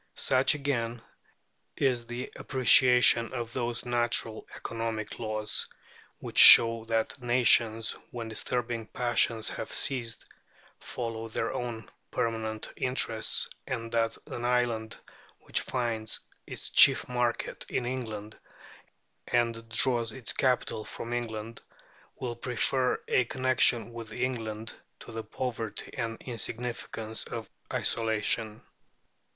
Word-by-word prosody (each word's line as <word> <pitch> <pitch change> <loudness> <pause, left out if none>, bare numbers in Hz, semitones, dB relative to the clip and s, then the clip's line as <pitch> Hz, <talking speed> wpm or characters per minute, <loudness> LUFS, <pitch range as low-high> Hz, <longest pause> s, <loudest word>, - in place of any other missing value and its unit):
Such, 130 +3 +3
again, 120 -5 -2 0.8
is 125 -4 0
the 120 +2 -6
appreciation 125 -2 +5
of 120 -2 -5
those 120 -2 -2
natural 120 -2 -1
economic 115 -2 -5
laws 110 -2 -2 0.5
which - - -2
show 115 -1 +10
that 115 +3 -2
nations, 120 -2 +3 0.2
when 115 -2 -6
disturbing 115 0 -2
passions 115 -1 +1
have 110 - -6
ceased, 120 -5 +1 0.5
follow 115 -1 -5
their 110 - -3
own 115 -3 -5 0.2
permanent 110 -1 -2
interests, 120 -4 +1 0.2
and 115 -3 -4
that 115 -1 0
an 120 - -7
island 120 -2 0 0.4
which - - -2
finds 115 -3 -2 0.3
its - - -6
chief - - +7
market 120 -1 -2
in 125 - -2
England 110 -4 -5 0.9
and 115 -1 -1
draws 115 -1 +1
its 125 -2 -5
capital 125 -4 0
from 115 +2 -7
England 115 -1 -5 0.6
will 120 -2 -4
prefer 125 +2 0
a 125 - +2
connection 125 -2 +2
with 115 -2 -8
England 115 -3 -4 0.3
to - - -10
the 115 0 -5
poverty 115 -1 -5
and 115 0 -4
insignificance 115 -2 -4
of - - -6 0.2
isolation. 110 -1 -1
115 Hz, 110 wpm, -28 LUFS, 110-125 Hz, 0.9 s, show